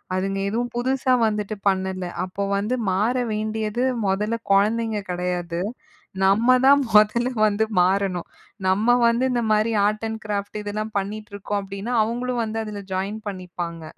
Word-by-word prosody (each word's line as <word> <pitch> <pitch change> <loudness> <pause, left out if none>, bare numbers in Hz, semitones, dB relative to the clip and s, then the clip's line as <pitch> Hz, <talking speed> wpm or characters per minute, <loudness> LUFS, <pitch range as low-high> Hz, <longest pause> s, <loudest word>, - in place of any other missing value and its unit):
அதுங்க 195 +1 -1
எதுவும் 240 +2 -2
புதுசா 260 +1 +1
வந்துட்டு 210 0 -2
பண்ணல. 190 -1 0 0.2
அப்ப 185 +2 -5 0.2
வந்து 210 +5 0 0.2
மாற 215 +7 +1 0.2
வேண்டியது 215 +2 -2 0.2
மொதல்ல 210 +4 0 0.2
கொழந்தைங்க 215 +2 +2
கெடையாது, 175 -1 -2 0.7
நம்ம 230 +6 +5
தான் 285 +1 +7
மொதல்ல 215 +4 +4 0.2
வந்து 210 +1 +1 0.2
மாறணும். 185 -1 +1 0.4
நம்ம 215 +6 +4
வந்து 235 +2 +2
இந்த 240 -1 0
மாரி 215 +2 +2
ஆர்ட் 215 +1 0
அண்ட் 220 0 -5
கிராஃப்ட் 205 0 -3
இதெல்லாம் 210 +1 -4
பண்ணிட்டிருக்கோம் 205 0 -4
அப்படீன்னா, 200 +5 -5
அவங்களும் 240 +2 -1
வந்து 220 +1 -3
அதுல 210 -1 -6
ஜாயின் 195 +3 -2
பண்ணிப்பாங்க. 175 -3 -6
210 Hz, 135 wpm, -23 LUFS, 195-230 Hz, 0.7 s, தான்